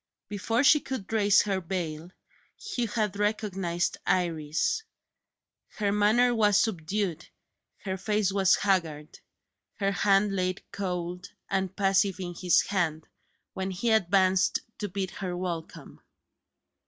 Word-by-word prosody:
Before 225 Hz, +5 st, 0 dB
she 300 Hz, +2 st, +6 dB
could 255 Hz, -7 st, -6 dB
raise 205 Hz, -1 st, +4 dB
her 195 Hz, -2 st, -1 dB
veil, 165 Hz, -2 st, -4 dB, 0.5 s
Hugh 255 Hz, -, -3 dB
had 210 Hz, -2 st, -2 dB
recognised 195 Hz, -5 st, -1 dB
Iris. 165 Hz, -, 0 dB, 1.0 s
Her 205 Hz, -2 st, +1 dB
manner 220 Hz, +4 st, +3 dB
was 210 Hz, -3 st, +3 dB
subdued; 185 Hz, -4 st, -1 dB, 0.6 s
her 190 Hz, -1 st, -3 dB
face 210 Hz, -1 st, 0 dB
was 190 Hz, -2 st, +4 dB
haggard; 165 Hz, -6 st, -1 dB, 0.6 s
her 195 Hz, -1 st, 0 dB
hand 195 Hz, +1 st, +2 dB
lay 185 Hz, -1 st, 0 dB, 0.2 s
cold 180 Hz, -2 st, -4 dB, 0.2 s
and 190 Hz, -1 st, -1 dB
passive 195 Hz, -1 st, +2 dB
in 175 Hz, -2 st, -5 dB
his 175 Hz, 0 st, +3 dB
hand, 165 Hz, -5 st, -2 dB, 0.5 s
when 190 Hz, 0 st, -3 dB
he 195 Hz, +5 st, -1 dB
advanced 190 Hz, -2 st, +3 dB, 0.2 s
to 205 Hz, -, -3 dB
bid 190 Hz, 0 st, -3 dB
her 180 Hz, -3 st, -5 dB
welcome. 175 Hz, -3 st, -6 dB
195 Hz, 120 wpm, -28 LUFS, 180-210 Hz, 1.0 s, she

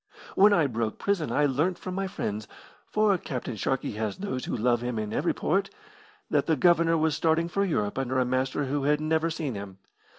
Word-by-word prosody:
When 205 Hz, +2 st, +6 dB
I 170 Hz, -6 st, +4 dB
broke 115 Hz, -4 st, -2 dB
prison 200 Hz, -6 st, -1 dB
I 145 Hz, -, +3 dB
learnt 155 Hz, +7 st, +1 dB
from 185 Hz, -, -6 dB
my 195 Hz, +1 st, -2 dB
friends 110 Hz, -, -4 dB, 0.4 s
for 215 Hz, -2 st, +3 dB
Captain 125 Hz, -5 st, -5 dB
Sharkey 135 Hz, +5 st, -1 dB
has 105 Hz, -1 st, -3 dB
those 185 Hz, -11 st, -4 dB
who -, -, -2 dB
love 120 Hz, +1 st, +2 dB
him 120 Hz, -1 st, -3 dB
in 110 Hz, -1 st, -3 dB
every -, -, +1 dB
port -, -, 0 dB, 0.6 s
that -, -, +1 dB
the 160 Hz, -, +3 dB
Governor 170 Hz, +1 st, +4 dB
was 160 Hz, -1 st, +1 dB
starting 165 Hz, +1 st, +2 dB
for 200 Hz, +3 st, 0 dB
Europe 130 Hz, -, -1 dB
under 130 Hz, 0 st, -1 dB
a 130 Hz, -, +3 dB
master 130 Hz, +3 st, 0 dB
who 140 Hz, +1 st, -1 dB
had 150 Hz, +1 st, +3 dB
never 160 Hz, +1 st, +1 dB
seen 155 Hz, -5 st, -3 dB
him. 100 Hz, -2 st, -7 dB
145 Hz, 205 wpm, -27 LUFS, 120-170 Hz, 0.6 s, When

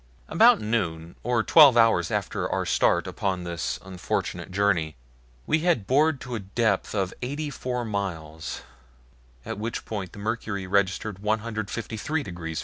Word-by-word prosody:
About -, -, +6 dB
noon, 85 Hz, -7 st, -2 dB
or 120 Hz, -1 st, +1 dB
twelve 145 Hz, -4 st, +7 dB
hours 115 Hz, -7 st, +4 dB
after -, -, -2 dB
our -, -, 0 dB
start -, -, +2 dB
upon 95 Hz, -3 st, -2 dB
this 85 Hz, -1 st, -3 dB
unfortunate 95 Hz, 0 st, -3 dB
journey, 90 Hz, -5 st, +1 dB, 0.5 s
we 155 Hz, -, +2 dB
had 160 Hz, -, +1 dB
bored 145 Hz, +4 st, +3 dB
to 125 Hz, -, -6 dB
a 115 Hz, -, -2 dB
depth 100 Hz, +1 st, 0 dB
of 95 Hz, -2 st, -1 dB
eighty 145 Hz, +4 st, -3 dB
four 125 Hz, -2 st, -3 dB
miles, 80 Hz, -7 st, -4 dB, 0.8 s
at 110 Hz, -2 st, -5 dB
which 115 Hz, +2 st, -4 dB
point 95 Hz, -5 st, -5 dB
the -, -, -12 dB
mercury 105 Hz, -2 st, -3 dB
registered 100 Hz, +1 st, 0 dB
153 110 Hz, +6 st, -2 dB
degrees 85 Hz, -5 st, -6 dB
F. -, -, 0 dB
105 Hz, 145 wpm, -26 LUFS, 95-120 Hz, 0.8 s, twelve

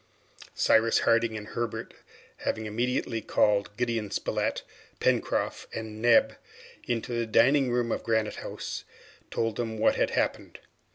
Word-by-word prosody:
Cyrus 110 Hz, +1 st, +4 dB
Harding 115 Hz, -1 st, +2 dB
and 105 Hz, 0 st, -8 dB
Herbert 120 Hz, -1 st, -4 dB, 0.4 s
having 110 Hz, 0 st, -2 dB
immediately 120 Hz, +1 st, -1 dB
called 105 Hz, -1 st, +1 dB
Gideon 115 Hz, -4 st, -1 dB
Spilett, -, -, -1 dB, 0.4 s
Pencroft, -, -, 0 dB
and 110 Hz, -1 st, -6 dB
Neb 120 Hz, -1 st, +4 dB, 0.5 s
into 120 Hz, 0 st, -2 dB
the 115 Hz, -1 st, -1 dB
dining 125 Hz, +4 st, +4 dB
room 120 Hz, -1 st, 0 dB
of -, -, -1 dB
Granite 110 Hz, -2 st, 0 dB
House, -, -, -6 dB, 0.5 s
told 115 Hz, -2 st, -1 dB
them 115 Hz, -2 st, -3 dB
what 110 Hz, -, +3 dB
had -, -, +2 dB
happened. -, -, -2 dB
115 Hz, 130 wpm, -28 LUFS, 110-120 Hz, 0.5 s, Cyrus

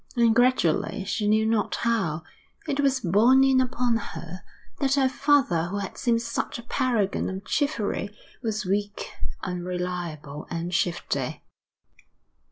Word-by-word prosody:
And 235 Hz, -2 st, +4 dB
gradually, 225 Hz, -5 st, +2 dB
she 205 Hz, +1 st, -1 dB
knew 215 Hz, +1 st, +3 dB
not 220 Hz, -1 st, +1 dB
how, 190 Hz, -10 st, 0 dB, 0.4 s
it 285 Hz, -2 st, -1 dB
was 270 Hz, -2 st, +2 dB
borne 225 Hz, +9 st, +5 dB
in 265 Hz, -1 st, +5 dB
upon 245 Hz, -2 st, +1 dB
her 180 Hz, -4 st, -7 dB, 0.4 s
that 275 Hz, -1 st, +2 dB
the 275 Hz, -2 st, +4 dB
father 265 Hz, -, +2 dB
who 190 Hz, +4 st, -3 dB
had 200 Hz, -2 st, -4 dB
seemed 230 Hz, -2 st, +1 dB
such 235 Hz, -, -3 dB
a 235 Hz, -, -9 dB
paragon 235 Hz, -4 st, 0 dB
of 190 Hz, +1 st, -5 dB
chivalry, 235 Hz, -9 st, 0 dB, 0.3 s
was 215 Hz, -3 st, -2 dB
weak, 205 Hz, +2 st, -2 dB, 0.3 s
unreliable, 180 Hz, -5 st, -4 dB
and 170 Hz, +1 st, -3 dB
shifty. 175 Hz, -1 st, -1 dB
215 Hz, 135 wpm, -26 LUFS, 180-250 Hz, 0.4 s, borne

